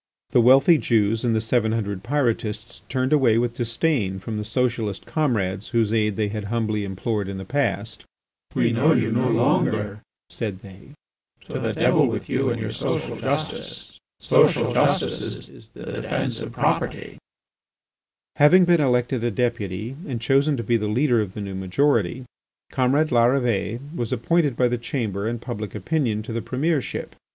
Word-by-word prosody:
The 120 Hz, -, +5 dB
wealthy 135 Hz, +7 st, +6 dB
Jews 110 Hz, -1 st, +1 dB
and 115 Hz, -2 st, +1 dB
the -, -, +2 dB
seven 110 Hz, -1 st, +1 dB
hundred 100 Hz, -4 st, -2 dB
Pyrotists 120 Hz, -4 st, -2 dB
turned 130 Hz, +1 st, 0 dB
away 125 Hz, -7 st, +4 dB
with 120 Hz, 0 st, 0 dB
disdain 115 Hz, -, 0 dB
from 105 Hz, +3 st, -5 dB
the -, -, -3 dB
socialist 115 Hz, -3 st, -2 dB
comrades 105 Hz, -10 st, -1 dB
whose 115 Hz, -3 st, +1 dB
aid 105 Hz, -2 st, +1 dB
they 105 Hz, -1 st, -1 dB
had 105 Hz, 0 st, -5 dB
humbly 110 Hz, -1 st, -1 dB
implored 100 Hz, +1 st, -2 dB
in 100 Hz, -, -5 dB
the 95 Hz, -, -7 dB
past. 120 Hz, -5 st, -1 dB, 0.5 s
"We 115 Hz, -, +2 dB
know 135 Hz, +8 st, +3 dB
you 110 Hz, -5 st, +1 dB
no 125 Hz, +3 st, +1 dB
longer," 110 Hz, -5 st, +1 dB, 0.3 s
said 100 Hz, -5 st, -5 dB
they. 100 Hz, +8 st, -14 dB, 0.5 s
"To -, -, -6 dB
the -, -, -2 dB
devil -, -, +3 dB
with -, -, -4 dB
you -, -, +1 dB
and -, -, -2 dB
your -, -, -3 dB
social -, -, -3 dB
justice. -, -, -4 dB, 0.2 s
Social -, -, +3 dB
justice -, -, 0 dB
is -, -, -16 dB
the -, -, -12 dB
defence -, -, -3 dB
of -, -, -6 dB
property." -, -, -1 dB, 1.2 s
Having 175 Hz, +5 st, +6 dB
been 175 Hz, -2 st, +4 dB
elected 125 Hz, -2 st, +1 dB
a 120 Hz, -, +1 dB
Deputy 115 Hz, -1 st, -2 dB
and 125 Hz, -5 st, -3 dB
chosen 135 Hz, +4 st, +2 dB
to 115 Hz, -, -3 dB
be 115 Hz, +2 st, +2 dB
the 105 Hz, -1 st, -2 dB
leader 120 Hz, +2 st, +2 dB
of 100 Hz, -3 st, -5 dB
the 105 Hz, -, -5 dB
new 100 Hz, -1 st, -5 dB
majority, 105 Hz, +4 st, 0 dB, 0.5 s
comrade 140 Hz, +5 st, +2 dB
Larrivée 120 Hz, -3 st, +2 dB, 0.2 s
was 120 Hz, -6 st, -3 dB
appointed 145 Hz, +3 st, +1 dB
by 125 Hz, -, +3 dB
the 120 Hz, 0 st, -1 dB
Chamber 110 Hz, -5 st, -3 dB
and 120 Hz, +1 st, -2 dB
public 110 Hz, -4 st, -6 dB
opinion 110 Hz, -, -1 dB
to 115 Hz, -, -6 dB
the 115 Hz, -, -2 dB
Premiership. 145 Hz, +3 st, -2 dB
115 Hz, 165 wpm, -23 LUFS, 105-130 Hz, 1.2 s, wealthy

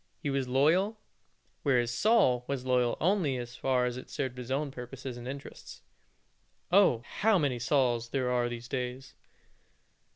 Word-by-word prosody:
He 145 Hz, -5 st, -3 dB
was 135 Hz, -2 st, -1 dB
loyal; 165 Hz, -, +2 dB, 0.6 s
whereas 120 Hz, -4 st, +2 dB
Saul 165 Hz, -, +3 dB
was 135 Hz, -2 st, -3 dB
loyal 125 Hz, -2 st, +2 dB
only 165 Hz, -6 st, +1 dB
as 120 Hz, 0 st, -7 dB
far 130 Hz, -1 st, +1 dB
as 125 Hz, 0 st, -2 dB
it 130 Hz, -, -9 dB
served 130 Hz, -2 st, -3 dB
his 125 Hz, 0 st, -7 dB
own 140 Hz, +2 st, -1 dB
purposes 125 Hz, 0 st, -7 dB
and 120 Hz, 0 st, -8 dB
interests. 140 Hz, +1 st, -9 dB, 0.9 s
Oh! 180 Hz, -, +5 dB
how 220 Hz, -1 st, +4 dB
many 140 Hz, -7 st, 0 dB
such 115 Hz, -, -4 dB
Sauls 120 Hz, -5 st, +2 dB
there 130 Hz, -1 st, -1 dB
are 120 Hz, -1 st, +2 dB
in -, -, -1 dB
these 120 Hz, 0 st, -7 dB
days. 125 Hz, +1 st, -4 dB
130 Hz, 165 wpm, -30 LUFS, 125-140 Hz, 0.9 s, Oh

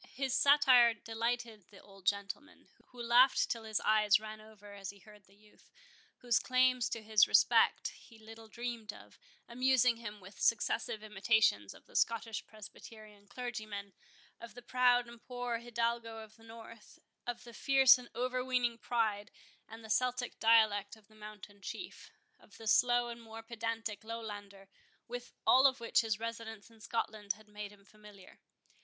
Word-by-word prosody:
His 265 Hz, -1 st, -2 dB
satire 260 Hz, -5 st, +5 dB
delighted 230 Hz, -1 st, -4 dB
the 200 Hz, -, -16 dB
old 195 Hz, -2 st, -16 dB
gentleman, 200 Hz, +8 st, -3 dB, 0.2 s
who 250 Hz, -, -16 dB
laughed 245 Hz, +3 st, +4 dB
till 230 Hz, -1 st, -4 dB
his 215 Hz, -1 st, -1 dB
eyes 215 Hz, -1 st, +4 dB
ran 215 Hz, 0 st, -9 dB
over 210 Hz, -1 st, -14 dB
as 195 Hz, -1 st, -7 dB
he 200 Hz, -, -9 dB
heard 210 Hz, 0 st, -18 dB
the 195 Hz, -, -24 dB
youth, 210 Hz, +1 st, -24 dB, 0.5 s
whose 240 Hz, -2 st, +2 dB
claims 255 Hz, -1 st, +2 dB
to 230 Hz, -, -5 dB
his 215 Hz, -1 st, +4 dB
respect -, -, +4 dB
he 230 Hz, -, -17 dB
little 225 Hz, 0 st, -13 dB
dreamed 235 Hz, -2 st, -5 dB
of, -, -, -16 dB, 0.3 s
amusing 250 Hz, -1 st, +2 dB
him 210 Hz, -2 st, -8 dB
with 195 Hz, +1 st, -14 dB
successive 220 Hz, -1 st, 0 dB
imitations 210 Hz, -, +1 dB
of -, -, -18 dB
the -, -, -21 dB
Scottish 225 Hz, -1 st, 0 dB
Presbyterian 215 Hz, -1 st, -13 dB
clergymen, 215 Hz, -4 st, -6 dB, 0.5 s
of 235 Hz, -, -11 dB
the 245 Hz, -, -11 dB
proud 245 Hz, -1 st, +3 dB
and 235 Hz, -1 st, -13 dB
poor 245 Hz, -2 st, -4 dB
Hidalgo 235 Hz, -1 st, -2 dB
of 220 Hz, -1 st, -11 dB
the 225 Hz, -, -21 dB
North, 225 Hz, 0 st, -13 dB, 0.3 s
of 245 Hz, 0 st, -4 dB
the 240 Hz, -1 st, -12 dB
fierce 265 Hz, +1 st, +5 dB
and 245 Hz, -, -12 dB
over 255 Hz, +1 st, -1 dB
weening 245 Hz, -2 st, 0 dB
pride 220 Hz, -4 st, -1 dB, 0.4 s
and 225 Hz, 0 st, -11 dB
Celtic 250 Hz, -1 st, -1 dB
dialect 220 Hz, -2 st, +3 dB
of 215 Hz, -1 st, -23 dB
the 215 Hz, -, -21 dB
mountain 210 Hz, -1 st, -12 dB
chief, 350 Hz, -, -8 dB, 0.3 s
of 200 Hz, -, -19 dB
the 225 Hz, -, -11 dB
slow 240 Hz, +2 st, +3 dB
and 235 Hz, 0 st, -8 dB
more 225 Hz, 0 st, -10 dB
pedantic 225 Hz, -2 st, -4 dB
Lowlander, 205 Hz, -3 st, -8 dB, 0.4 s
with 245 Hz, 0 st, -7 dB
all 260 Hz, +2 st, +7 dB
of 265 Hz, -1 st, -1 dB
which 230 Hz, 0 st, +2 dB
his 220 Hz, -3 st, -1 dB
residence 230 Hz, -2 st, -7 dB
in 225 Hz, -1 st, -20 dB
Scotland 215 Hz, -3 st, -3 dB
had 215 Hz, 0 st, -19 dB
made 210 Hz, -1 st, -8 dB
him 200 Hz, -1 st, -20 dB
familiar. 210 Hz, -3 st, -16 dB
225 Hz, 165 wpm, -33 LUFS, 210-240 Hz, 0.5 s, all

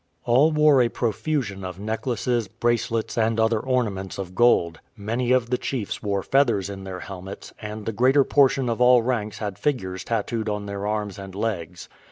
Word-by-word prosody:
All 135 Hz, +7 st, +4 dB
wore 150 Hz, -3 st, +5 dB
a 120 Hz, -, +2 dB
profusion 110 Hz, -3 st, -2 dB
of 90 Hz, 0 st, -6 dB
necklaces, 115 Hz, +1 st, -1 dB
bracelets, 115 Hz, 0 st, -1 dB
and 115 Hz, 0 st, +1 dB
other 110 Hz, 0 st, +2 dB
ornaments 105 Hz, -7 st, -2 dB
of 95 Hz, -2 st, -6 dB
gold; 90 Hz, -7 st, +3 dB, 0.2 s
many 115 Hz, +4 st, -1 dB
of 125 Hz, -2 st, +2 dB
the 125 Hz, -, +1 dB
chiefs 120 Hz, -7 st, -3 dB
wore 100 Hz, -3 st, -1 dB
feathers 115 Hz, -8 st, +2 dB
in 95 Hz, -1 st, -8 dB
their 90 Hz, -1 st, -6 dB
helmets, 95 Hz, 0 st, -9 dB
and 105 Hz, 0 st, -6 dB
the -, -, -1 dB
greater 130 Hz, +6 st, +4 dB
portion 135 Hz, -2 st, +3 dB
of 115 Hz, 0 st, -1 dB
all 125 Hz, -1 st, +6 dB
ranks 110 Hz, -4 st, -2 dB
had 105 Hz, -2 st, -5 dB
figures 95 Hz, -10 st, -2 dB
tattooed 115 Hz, 0 st, -2 dB
on 105 Hz, -1 st, -3 dB
their 100 Hz, 0 st, -4 dB
arms 105 Hz, -2 st, -3 dB
and 95 Hz, -1 st, -9 dB
legs. 90 Hz, -6 st, -4 dB
110 Hz, 180 wpm, -24 LUFS, 100-125 Hz, 0.2 s, all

